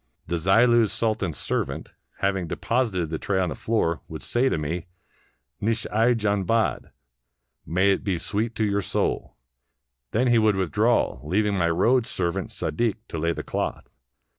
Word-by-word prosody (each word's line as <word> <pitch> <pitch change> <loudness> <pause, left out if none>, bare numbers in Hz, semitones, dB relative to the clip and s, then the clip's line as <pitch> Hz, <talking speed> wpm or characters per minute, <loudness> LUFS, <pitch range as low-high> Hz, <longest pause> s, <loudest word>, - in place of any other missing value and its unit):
The 85 - -1
Zillu's 115 +5 +4
Sultan's 105 -8 -1
servant, - - -2 0.3
having 95 -3 0
deposited 105 -7 -1
the 80 - -2
tray 100 -2 0
on 90 -2 +1
the - - -4
floor, 85 -8 0
would - - -8
say 125 +3 +1
to - - 0
me, 80 +5 -3 0.4
" 65 +2 -43
Nush 110 +1 0
i 115 +3 +4
jan 100 -3 0
bad 115 +4 0 0.4
" - - -55 0.3
("May 95 +4 +3
it 100 - 0
be 95 -4 0
sweet 110 +6 -2
to 110 - +1
your 100 0 +1
soul!"), - - -2 0.7
then 120 +4 +1
he 120 -2 +4
would 110 -2 +3
with 95 -3 -1
draw, 110 - +2
leaving 100 - +1
my 85 -3 +2
road 115 +8 +3
servant 95 +1 -2
Sadik 115 +4 -1
to 80 - -4
lay 85 +2 +1
the - - -4
cloth. - - -3
100 Hz, 175 wpm, -25 LUFS, 85-115 Hz, 0.7 s, Zillu's